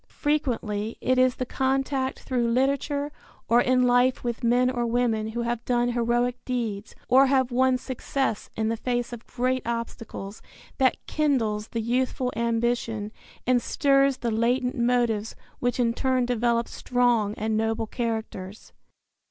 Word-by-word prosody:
Frequently 235 -8 -1
it 255 0 +1
is 255 -1 +4
the 255 - -3
contact 265 +1 -1
through 245 -2 0
literature 280 +3 0 0.4
or 235 +2 +5
in 255 0 +3
life 245 +1 +3
with 240 +1 -3
men 245 +2 +3
or 245 -2 -1
women 230 -2 0
who 235 +2 -3
have 235 0 -2
done 240 0 +1
heroic 240 +1 0
deeds 225 -5 -3
or 265 +2 +6
have 260 -2 +2
won 260 +1 +3
success 260 -2 -3
in 220 0 0
the 230 - -1
face 245 0 -2
of 235 -1 -9
great 255 +1 0
obstacles 230 -3 -5 0.4
that 260 -1 +3
kindles 225 -9 0
the 230 - -3
youthful 250 +2 -1
ambition 230 -2 -1 0.3
and 250 -1 +3
stirs 275 +1 +2
the 235 -2 -2
latent 245 +3 +1
motives 235 -3 +1 0.2
which 245 +1 -1
in 230 -1 +2
turn 255 0 +1
develop 235 -1 +1
strong 240 -4 +1
and 220 0 -1
noble 225 +1 0
characters. 220 -4 -5
245 Hz, 145 wpm, -26 LUFS, 230-255 Hz, 0.4 s, or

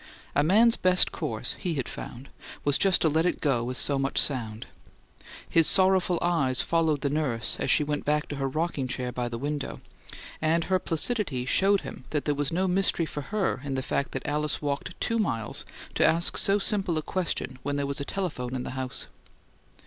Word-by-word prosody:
A - - +3
man's 220 +9 +4
best 185 0 +4
course, - - -2
he 175 -4 -2
had 135 -4 -2
found, 130 +3 -8 0.4
was 145 -1 +4
just 195 -2 +5
to - - +4
let 160 +1 +2
it - - -1
go 125 -5 0
as 130 - -3
so 140 +1 +2
much 135 0 -2
sound. 115 -5 0 0.8
His 165 -2 +4
sorrowful 185 -2 +4
eyes 155 -8 +1
followed 160 -4 +1
the 140 - 0
nurse 140 -7 -1
as - - -1
she 150 - +4
went 145 0 -2
back 150 +1 0
to 145 - -5
her 135 -1 -1
rocking 155 -2 -2
chair 125 -1 -3
by 120 -1 -3
the 115 - -5
window, 145 +2 -3 0.6
and 160 +2 +2
her 185 +1 +1
placidity 165 - 0
showed 195 +8 +3
him 130 -2 -9
that 150 -2 -2
there 150 - +1
was 145 -1 -1
no 185 +3 +1
mystery 185 -2 +1
for 150 -1 -5
her 200 -10 -1
in 140 -2 -3
the 130 - -2
fact 140 - -1
that 135 - -4
Alice 150 +1 0
walked 145 -1 -4
two 230 -1 0
miles 115 - -2 0.3
to - - +2
ask 170 +2 +3
so 200 +1 +2
simple 195 -4 0
a 155 - -1
question 165 -8 -2
when 145 +1 -2
there 140 0 -1
was 140 +1 -3
a - - -1
telephone 140 -8 -4
in 125 - -3
the - - -5
house. 130 -1 -5
150 Hz, 205 wpm, -27 LUFS, 135-175 Hz, 0.8 s, just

